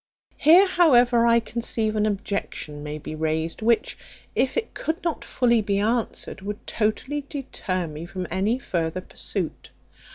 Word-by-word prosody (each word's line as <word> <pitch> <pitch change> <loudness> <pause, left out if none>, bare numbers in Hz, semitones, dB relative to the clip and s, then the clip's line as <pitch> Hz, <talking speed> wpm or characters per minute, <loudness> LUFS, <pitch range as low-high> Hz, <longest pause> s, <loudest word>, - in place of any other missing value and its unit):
Here, 340 +6 +7
however, 245 -10 +5
I 235 0 +5
conceive 225 -1 -2
an 215 0 +2
objection 195 -7 -3
may 150 +1 -5
be 155 - -7
raised, 160 +2 -1
which, 230 +1 +1 0.3
if 260 - +1
it 460 - -2
could 325 +3 -3
not 335 -3 -2
fully 235 -3 +2
be 200 -1 0
answered, 220 -1 -1
would 205 +1 -6
totally 255 +7 -1
deter 185 -10 -3
me 155 +1 -7
from 185 0 -5
any 200 +6 +1
further 175 -7 -2
pursuit. - - -5
215 Hz, 150 wpm, -24 LUFS, 185-245 Hz, 0.3 s, Here